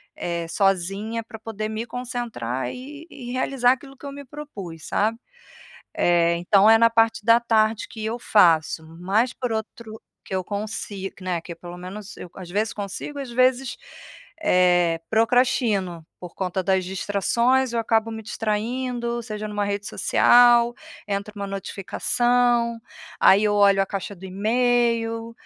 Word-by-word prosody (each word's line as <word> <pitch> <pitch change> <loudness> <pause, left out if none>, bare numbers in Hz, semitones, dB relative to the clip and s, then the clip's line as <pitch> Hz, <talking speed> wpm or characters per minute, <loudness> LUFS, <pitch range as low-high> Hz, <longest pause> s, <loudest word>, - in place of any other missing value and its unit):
eh, 170 -1 -3
sozinha 195 +5 0
pra 220 - -10
poder 215 -1 -5
me 220 +1 -4
concentrar 230 - -4
e 290 +5 -10
e 245 -5 -8
realizar 255 -1 +2
aquilo 270 +1 -11
que 285 - -13
eu 280 - -5
me 285 0 -9
propus, 210 - -9
sabe? 225 +3 0 0.8
Eh, 170 -1 +3
então 195 +4 +4
é 225 - +8
na 230 0 +5
parte 225 -1 +2
da 230 +1 +6
tarde 225 -1 +1
que 220 -1 -8
eu 225 +2 -2
faço, 165 -8 +3 0.2
mas 215 +7 +1
por 250 -3 -4
outro 220 0 -6 0.2
que - - -6
eu 185 - 0
consigo 205 -1 -5
que - - -14
né, 180 -2 -1
que 170 +1 -9
pelo 175 +1 -10
menos 200 +3 -9
eu, - - -9
às 180 -2 -9
vezes 215 +4 0
consigo, 205 +8 -6
às 270 -3 -6
vezes, 255 +1 +2 0.7
eh, 175 - +3
procrastino, 220 - +1 0.2
por 180 -1 -9
conta 190 0 -2
das 190 0 +1
distrações 235 +7 +1
eu 235 - -1
acabo 225 0 +1
me 220 0 -6
distraindo. 235 +3 -2
Seja 215 -2 -5
numa 205 -1 -2
rede 200 0 -3
social, 240 0 +5 0.3
entra 200 +1 -3
uma 200 -1 -4
notificação, 235 +5 0 0.4
aí 200 +3 +6
eu 210 -1 +2
olho 200 -1 +5
a - - -2
caixa 195 +1 -5
do 185 - -13
email, 230 +2 0
215 Hz, 155 wpm, -23 LUFS, 195-240 Hz, 0.8 s, é